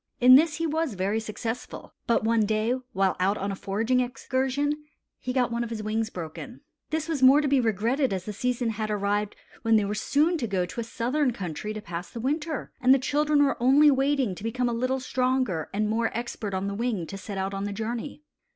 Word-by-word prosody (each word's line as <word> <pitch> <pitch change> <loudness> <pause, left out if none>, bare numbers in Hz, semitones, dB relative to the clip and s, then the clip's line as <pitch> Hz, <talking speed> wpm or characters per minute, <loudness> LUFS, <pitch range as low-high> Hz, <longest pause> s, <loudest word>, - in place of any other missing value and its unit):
In 255 0 +8
this 300 +3 +6
he 330 - -2
was 315 -6 -1
very 195 +4 0
successful. 225 +2 -6
But 235 - +2
one 225 0 +3
day, 215 +2 +1 0.2
while 190 -1 +1
out 195 +3 +2
on 200 +1 -2
a - - -3
foraging 220 +7 0
excursion, 265 +4 -1 0.4
he 255 - -4
got 250 -2 +1
one 235 0 -1
of 235 - -5
his 220 -2 -5
wings 220 +1 -1
broken. 180 - -8 0.3
This 315 0 -2
was 315 -5 -2
more 265 +3 +7
to 300 - 0
be 275 -1 +3
regretted 235 +5 +1
as 185 -2 -3
the 210 - -4
season 245 +2 -1
had 215 0 -3
arrived 205 0 -1 0.3
when 225 0 +3
they 210 -2 +3
were 200 - -2
soon 310 +9 +1
to 235 - -2
go 190 -3 0
to 180 - -7
a - - -1
southern 250 +4 0
country 195 0 -5
to 215 0 -5
pass 170 -1 -6
the 235 - -7
winter, 300 +4 -2
and 260 +1 +6
the - - +3
children 295 +2 +2
were 275 -4 0
only 285 +4 +6
waiting 270 -5 +1
to 190 - -10
become 245 +2 -1
a 240 - -1
little 255 +3 0
stronger 255 - 0
and 210 +1 0
more 225 +2 +1
expert 225 -4 -4
on 190 +1 -2
the 200 - -2
wing 215 -5 -2
to 195 - -8
set 195 0 -7
out 190 +1 -2
on 195 +1 -3
the 205 - -3
journey. 230 +7 -5
235 Hz, 225 wpm, -26 LUFS, 205-265 Hz, 0.4 s, In